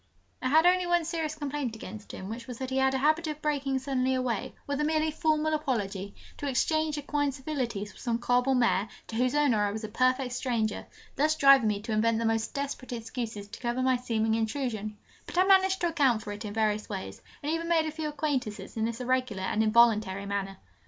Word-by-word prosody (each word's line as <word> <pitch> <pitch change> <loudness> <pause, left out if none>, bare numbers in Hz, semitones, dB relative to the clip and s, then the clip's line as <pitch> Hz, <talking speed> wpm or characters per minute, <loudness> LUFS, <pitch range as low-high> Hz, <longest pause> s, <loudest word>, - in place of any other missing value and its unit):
I 255 - 0
had 315 +4 +5
only 360 0 +4
one 345 -1 +2
serious 320 -2 -2
complaint 290 -5 -3
against 215 0 -9
him, 190 - -7
which 230 +2 -7
was 250 -2 -6
that 260 +1 -5
he 260 - 0
had 265 0 +3
a - - +2
habit 310 +4 +2
of 305 -1 -4
breaking 285 -3 0
suddenly 260 -1 0
away, 250 -4 -2
with 285 0 -2
a - - +2
merely 310 0 +1
formal 310 0 +1
apology, 205 -10 -2 0.2
to 290 - -4
exchange 310 +3 +1
equine 290 0 0
civilities 255 -7 -4
with - - -15
some 235 -3 0
cob 245 +1 +1
or 265 - +3
mare, 230 -4 +2 0.2
to 225 - -5
whose 250 +3 +1
owner 265 -8 +3
I 205 - +1
was 220 +2 -5
a - - -3
perfect 255 +3 +1
stranger, 230 -4 -1 0.3
thus 305 +2 +3
driving 275 -5 +6
me 205 -1 0
to 225 - -5
invent 220 +1 +2
the 230 - -1
most 225 +2 0
desperate 280 -3 -4
excuses 225 -3 -5
to 220 - -9
cover 240 +1 -1
my 260 0 +3
seeming 225 -3 0
intrusion: 220 -2 -2 0.3
but - - -7
I 365 - +6
managed 380 -1 +4
to 345 - +2
account 265 -9 +2
for 205 - -6
it 205 +2 -6
in 205 - -5
various 215 -1 0
ways, 195 -3 -6 0.2
and 295 - -1
even 330 +1 -2
made 325 -2 +3
a 310 - -2
few 310 0 -4
acquaintances 260 -10 -3
in 220 -1 0
this 230 +2 -3
irregular 250 -6 0
and 215 +3 0
involuntary 215 -3 +3
manner. 195 -1 -3
255 Hz, 220 wpm, -29 LUFS, 220-295 Hz, 0.3 s, driving